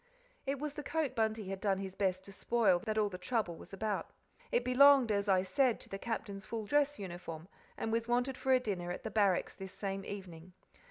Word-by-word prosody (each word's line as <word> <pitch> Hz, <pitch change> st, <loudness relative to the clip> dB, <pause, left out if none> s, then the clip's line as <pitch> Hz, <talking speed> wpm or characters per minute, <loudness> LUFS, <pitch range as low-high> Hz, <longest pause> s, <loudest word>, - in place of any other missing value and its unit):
It 275 Hz, +1 st, 0 dB
was 295 Hz, +1 st, -4 dB
the 295 Hz, -, -5 dB
coat 295 Hz, -2 st, -1 dB
Bunty 220 Hz, -3 st, 0 dB
had 195 Hz, 0 st, -4 dB
done 195 Hz, -2 st, +2 dB
his 190 Hz, -1 st, -5 dB
best 190 Hz, -1 st, -1 dB
to 200 Hz, -, -10 dB
spoil 200 Hz, -2 st, +2 dB
that 215 Hz, 0 st, 0 dB
all 215 Hz, -1 st, +3 dB
the 180 Hz, -3 st, -7 dB
trouble 185 Hz, -3 st, -1 dB
was -, -, -13 dB
about. 205 Hz, +1 st, -2 dB, 0.4 s
It 240 Hz, -, +2 dB
belonged, 260 Hz, -1 st, +7 dB
as 200 Hz, 0 st, 0 dB
I 185 Hz, -1 st, +4 dB
said, 240 Hz, +6 st, +2 dB
to -, -, -10 dB
the 195 Hz, -, -5 dB
Captain's 210 Hz, -3 st, -4 dB
full 220 Hz, -1 st, -3 dB
dress 290 Hz, +4 st, +2 dB
uniform, 175 Hz, -4 st, -7 dB, 0.3 s
and 225 Hz, -, -2 dB
was 230 Hz, 0 st, 0 dB
wanted 245 Hz, +2 st, +1 dB
for 265 Hz, -, -1 dB
a 260 Hz, -, +6 dB
dinner 185 Hz, -7 st, -3 dB
at -, -, -5 dB
the 220 Hz, -, -4 dB
Barracks 200 Hz, -4 st, +2 dB
this 190 Hz, -1 st, -8 dB
same 195 Hz, -1 st, -3 dB
evening. 185 Hz, -3 st, -8 dB
210 Hz, 220 wpm, -34 LUFS, 190-245 Hz, 0.4 s, belonged